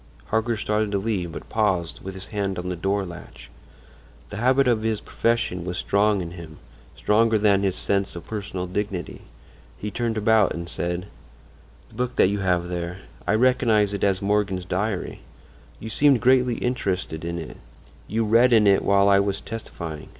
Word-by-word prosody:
Harker 110 +1 0
started 105 0 0
to - - +2
leave, 95 -4 -2
but - - -8
paused, 95 -6 0
with 95 0 -7
his 95 0 -8
hand 100 -2 -2
on 90 +1 -4
the 90 - -2
door 95 +3 -1
latch. 85 -1 -11 0.8
The 105 - -5
habit 130 +4 +3
of 115 -3 +2
his 110 -1 -1
profession 115 -8 -1
was 90 0 -4
strong 100 0 +2
in 85 - -7
him—stronger 85 - -1
than 100 -2 +3
his 95 -2 0
sense 100 -2 -1
of 85 - -8
personal 100 -4 -4
dignity. 95 -2 -4 0.6
He 105 +7 -5
turned 115 +1 -2
about 110 -1 +3
and 85 0 -5
said: 90 +1 -3 0.8
"The - - -21
book 125 +2 -3
that - - +4
you 100 0 -1
have 90 -2 +1
there—I 90 +3 -4
recognize 110 -4 +3
it 100 - -3
as 100 -1 +1
Morgan's 100 -3 0
diary. 95 +1 -2 0.6
You 110 - -7
seemed 140 +2 +4
greatly 125 0 +3
interested 95 -11 -2
in 85 0 -3
it; 80 -2 -7 0.5
you 110 +1 0
read 120 +3 +5
in 110 -2 +5
it 100 -1 +5
while 100 0 +4
I 100 -1 +5
was 100 0 0
testifying. 85 -8 -7
100 Hz, 170 wpm, -24 LUFS, 90-110 Hz, 0.8 s, read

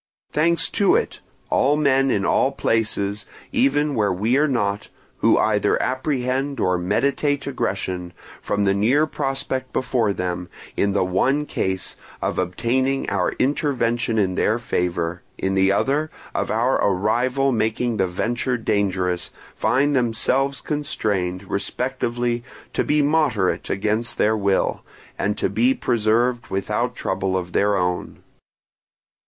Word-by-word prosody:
Thanks 165 +3 +2
to 200 - +3
it, - - -1 0.3
all 145 +2 +3
men 135 -2 +3
in 100 -6 +1
all 135 - +3
places, 110 -5 -1 0.2
even 245 - +2
where 105 -5 +1
we 105 +7 +1
are 150 +2 +3
not, 105 -7 -1 0.3
who - - +4
either - - +2
apprehend 130 +1 -1
or 90 -1 +1
meditate 140 +9 0
aggression, 95 -9 -3 0.3
from 105 0 -1
the 100 -1 +3
near 120 +10 +3
prospect 135 -3 -3
before 120 -5 +1
them, 90 -1 -3 0.3
in 100 -1 +1
the 100 - +2
one 130 +11 +1
case, 95 -8 -2 0.2
of - - -2
obtaining 125 +9 0
our 95 -3 0
intervention 120 -5 0
in 95 -3 +2
their 110 +4 +1
favour, 90 -6 -2 0.2
in 95 0 -1
the 95 0 +3
other, 140 +9 +1 0.2
of - - -1
our 120 +4 +1
arrival 120 +8 +1
making 115 0 0
the 95 -2 +2
venture 120 +7 -1
dangerous, 95 -5 0 0.2
find 145 +2 +1
themselves 130 +3 +1
constrained, 100 -11 -2
respectively, 120 +3 -2 0.3
to - - +1
be 150 0 +2
moderate 140 -10 +1
against 110 +4 -1
their 110 +1 +3
will, 100 -2 +1 0.4
and 100 +1 0
to - - +1
be 120 +6 +2
preserved 120 +1 +1
without 95 0 -1
trouble 95 -1 -1
of 90 -1 -4
their 100 +2 +2
own. 90 -1 -2
115 Hz, 135 wpm, -22 LUFS, 100-135 Hz, 0.4 s, who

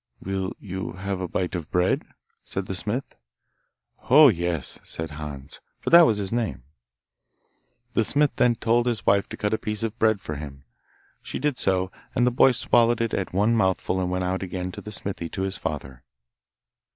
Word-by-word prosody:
'Will 95 -1 -3
you 95 -2 -5
have 95 0 -4
a 90 - -2
bite 90 +2 -2
of 85 -4 -4
bread?' 90 +1 +1 0.4
said 95 - -4
the 95 - -4
smith. 110 +8 -3 0.9
'Oh, 145 +3 +9
yes,' 85 - -1
said 80 0 -6
Hans, 75 -2 -7 0.2
for - - -3
that 170 -1 +9
was 110 - +2
his 100 0 -2
name. 115 - -2 1.3
The 115 - +3
smith 145 +5 +2
then 120 -1 +4
told 120 +1 +1
his 115 -5 -1
wife 100 0 +3
to - - -7
cut 105 0 -1
a 110 - +1
piece 105 0 -3
of 115 0 -3
bread 110 -2 +3
for 75 -6 -6
him. 70 -2 -9 0.6
She - - -5
did 145 -2 -1
so, 95 -1 +1 0.2
and 120 - +3
the 125 - +3
boy 125 - +6
swallowed 120 -1 +3
it 115 -1 -1
at 95 - -2
one 105 +5 +2
mouthful 95 -2 +1
and 90 - -1
went 90 0 -1
out 90 +1 -1
again 90 -1 -4
to - - -8
the - - -8
smithy 95 -5 -3
to 95 - -3
his 95 0 -3
father. 65 -2 -5
95 Hz, 190 wpm, -25 LUFS, 90-115 Hz, 1.3 s, Oh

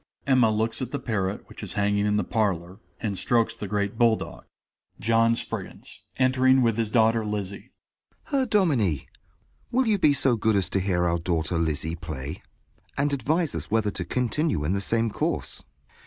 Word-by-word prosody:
(Emma 130 -5 +4
looks 110 +2 -1
at 125 - -3
the 145 - -3
parrot 105 -7 -2
which - - -12
is - - -7
hanging 100 0 +1
in 105 0 +2
the - - +1
parlor, 95 -4 -1 0.2
and 100 -4 -2
strokes 115 -2 +1
the 105 - -6
great 100 +1 -2
bull 115 -2 +5
dog.) - - -8 0.5
JOHN 115 +1 +3
SPRIGGINS - - -7 0.2
(entering 130 0 +4
with 115 -2 +2
his 115 -2 0
daughter 115 0 +3
Lizzie). 100 -2 -5 0.5
Herr 270 -3 0
Dominie, 135 - +2 0.6
will 260 +2 +2
you 215 -3 +2
be 150 -5 +5
so 135 -3 +2
good 110 0 +2
as 95 -3 +1
to 95 - +1
hear 90 -2 +1
our 85 0 +1
daughter 85 0 -1
Lizzie 80 0 -1
play, 80 -1 -6 0.6
and 145 +1 +1
advise 150 +5 0
us - - -4
whether 105 -1 +1
to 90 - -4
continue 125 - 0
in 80 +6 0
the 100 - 0
same 115 +2 +1
course. - - -2
110 Hz, 180 wpm, -26 LUFS, 95-125 Hz, 0.6 s, bull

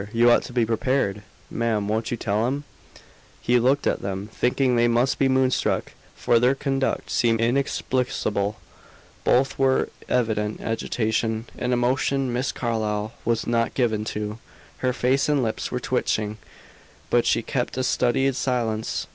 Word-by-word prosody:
You 120 +1 +5
ought - - +5
to - - -9
be 120 -2 +2
prepared. 115 -2 0 0.3
Ma'am, 110 -3 0
won't 110 +2 -1
you 120 - -2
tell 110 +2 0
him?" 140 +3 -2 0.8
He 120 +1 +2
looked 135 +4 +2
at - - 0
them, 100 +1 -4
thinking 125 0 +1
they 120 0 +4
must 120 +3 +1
be 135 - +3
moonstruck, 130 -1 +1 0.2
for 120 - +3
their 125 +3 +3
conduct 135 -1 -1
seemed 115 -2 +2
inexplicable. 120 -4 0 0.7
Both 135 +2 +2
were 135 -1 +3
in - - -10 0.2
evident 110 -3 0
agitation, 110 0 -1
an 125 - -2
emotion 130 +1 +1
Miss 125 +3 -1
Carlyle 110 -2 -2
was 115 -1 0
not 115 -1 0
given 110 -5 +1
to. 105 0 -4 0.4
Her 130 - +1
face 130 +3 +1
and 145 -3 +2
lips 110 -1 -2
were 125 - -2
twitching, 110 -4 -1 0.7
but 120 -1 +3
she - - +2
kept 125 +1 -2
a 130 - 0
studied 135 +1 +1
silence. 115 -4 -1
Mr. - - -27
120 Hz, 155 wpm, -24 LUFS, 110-130 Hz, 0.8 s, You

